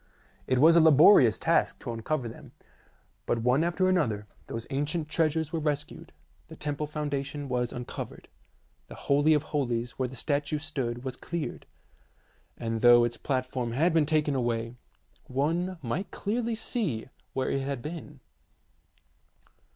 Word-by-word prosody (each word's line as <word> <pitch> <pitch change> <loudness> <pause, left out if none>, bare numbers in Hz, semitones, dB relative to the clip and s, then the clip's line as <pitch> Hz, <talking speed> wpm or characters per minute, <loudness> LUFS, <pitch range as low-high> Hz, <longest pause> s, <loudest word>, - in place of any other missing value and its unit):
It 130 - +2
was 160 +6 +7
a 170 - +7
laborious 150 - +7
task - - +1
to - - -4
uncover 120 +3 -2
them, 115 - -11 0.7
but 115 -1 0
one 125 +5 +3
after 175 +2 +1
another 125 - +1 0.2
those 115 0 -5
ancient 150 +3 -2
treasures 160 0 0
were 165 - 0
rescued; 150 -2 -3 0.4
the - - -11
temple 150 0 -3
foundation 145 -1 -3
was 125 -2 -1
uncovered; 120 0 -7 0.6
the - - -10
holy 145 +3 +3
of 150 - +1
holies 125 -6 -2
where 130 -1 0
the 130 - -10
statue 145 +3 -1
stood 130 -6 -4
was 130 -2 -4
cleared, 170 +3 -5 0.9
and 115 -1 -3
though 120 -1 +7
its 120 0 -1
platform 130 -2 -2
had 160 +7 +2
been 160 -3 +3
taken 155 -2 +1
away, 120 -3 -1 0.5
one 165 +8 -1
might 130 +12 -3
clearly 230 +2 -2
see 205 - -2 0.3
where 130 - -1
it 135 - 0
had 135 -3 -4
been. 150 -3 -8
145 Hz, 145 wpm, -28 LUFS, 125-160 Hz, 0.9 s, was